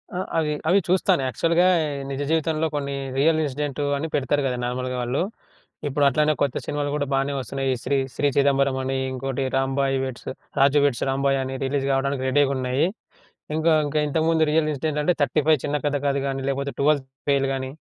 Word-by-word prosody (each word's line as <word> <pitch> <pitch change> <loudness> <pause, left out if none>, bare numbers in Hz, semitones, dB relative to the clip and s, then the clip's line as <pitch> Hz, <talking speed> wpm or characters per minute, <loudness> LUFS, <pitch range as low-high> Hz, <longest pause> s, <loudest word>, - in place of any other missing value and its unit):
ఆ! - - -2 0.2
అవి, 155 -2 +1 0.2
అవి 195 +3 +5
చూస్తాను 180 -6 +2
యాక్చువల్‌గా 170 +6 +2 0.4
నిజ 135 0 -4
జీవితంలో 160 0 +1
కొన్ని 140 -1 -2 0.2
రియల్ 160 +3 +3
ఇన్సిడెంటు 145 0 -2
అని 160 +3 -3
పెడతారు 145 +1 +1
గదా 125 -2 -1
నార్మల్‌గా 125 +1 -3
వాళ్ళు. 125 +6 -1 0.7
ఇప్పుడు 145 +1 0
అట్లనే 150 +3 +2
కొత్త 140 -3 +1
సినిమాలు 145 -1 -2
కూడా 145 -1 0
బానే 135 +1 +1
వొస్తున్నాయి. 135 +1 -3
ఈ - - -1
శ్రీ 140 - +1 0.2
'శ్రీ 145 - +1
చిదంబరం' 140 -1 +3
అని, 135 0 -1
ఇంకోటి 135 +1 -3
రాంబాయ్ 135 0 +1
వెడ్స్ 130 -2 -6 0.3
'రాజు 140 +1 +5
వెడ్స్ 130 -5 0
రాంబాయ్' 135 0 +1
అని 130 0 -4
రిలీజ్ 135 0 -1
కావడానికి 135 0 0
రెడీగున్నాయి. 135 0 +2 0.7
ఇంకా 160 +1 +3
ఇంకా 150 +1 -1
ఇంతకుముందు 160 +2 +1
రియల్ 155 0 +2
ఇన్సిడెంట్ 150 +1 -2
అంటే 180 - +3
'35 150 +2 +3
చిన్న 145 0 0
కథ 145 0 +1
కాదు' 140 -1 +1
కానీ, 135 -1 -2
లేకపోతే 140 +1 -2
'12 145 -1 +3 0.3
ఫెయిల్' 135 -1 +2
గానీ, 130 0 -4
140 Hz, 175 wpm, -23 LUFS, 135-150 Hz, 0.7 s, అవి